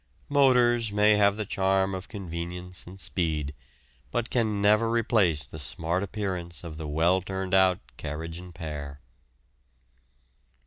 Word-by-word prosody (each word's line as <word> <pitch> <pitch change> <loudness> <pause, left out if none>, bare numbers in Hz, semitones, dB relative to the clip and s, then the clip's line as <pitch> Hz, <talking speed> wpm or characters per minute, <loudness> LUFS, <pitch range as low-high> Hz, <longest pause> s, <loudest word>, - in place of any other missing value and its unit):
Motors 125 -5 +4
may 105 +1 +5
have 100 0 +4
the 110 - -2
charm 95 0 +1
of 95 0 -5
convenience 90 -2 -6
and 95 +2 -11
speed, 80 -6 -1 0.6
but 120 0 -2
can 110 -4 +1
never 105 +3 +4
replace 105 - +2
the 80 +6 -9
smart 80 +5 -1
appearance 95 -5 -4
of 80 -3 -7
the 80 -1 -5
well 85 +5 +2
turned 95 0 -4
out 95 -1 +5 0.2
carriage 80 +3 -5
and 90 -1 -11
pair. 75 -4 -6
95 Hz, 135 wpm, -27 LUFS, 85-105 Hz, 0.6 s, may